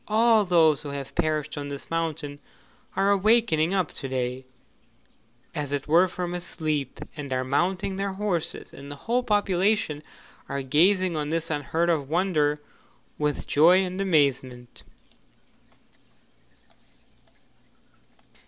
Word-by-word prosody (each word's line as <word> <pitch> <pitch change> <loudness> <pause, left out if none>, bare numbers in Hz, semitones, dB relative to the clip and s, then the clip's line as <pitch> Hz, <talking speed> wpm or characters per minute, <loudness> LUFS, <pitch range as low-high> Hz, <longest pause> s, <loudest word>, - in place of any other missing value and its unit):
All 220 0 +4
those 160 -5 +4
who 145 - -7
have 140 -1 -6
perished 155 -3 -1
on 145 - -5
this 140 +2 -8
mountain 160 -3 -3 0.6
are 195 +1 +3
awakening 200 -5 +3
up 185 -5 0
to 135 - -5
day, 130 0 -3 1.1
as 150 -3 -3
it 145 -1 -2
were 170 +5 +5
from 180 -1 -4
a 175 - -3
sleep, 155 -6 -3 0.2
and 145 -3 -7
are 130 0 0
mounting 180 +8 0
their 195 0 -2
horses, 190 -5 -3
and 140 +1 -10
the 145 - -7
whole 245 +2 +2
population 205 -6 +1 0.5
are 140 -1 -3
gazing 180 +6 +3
on 150 -1 -2
this 165 0 -1
unheard 160 +3 0
of 145 -4 -1
wonder 155 -4 +1 0.6
with 150 -1 -1
joy 175 +6 +5
and 185 +1 -4
amazement. 135 -8 0
160 Hz, 125 wpm, -26 LUFS, 145-185 Hz, 1.1 s, were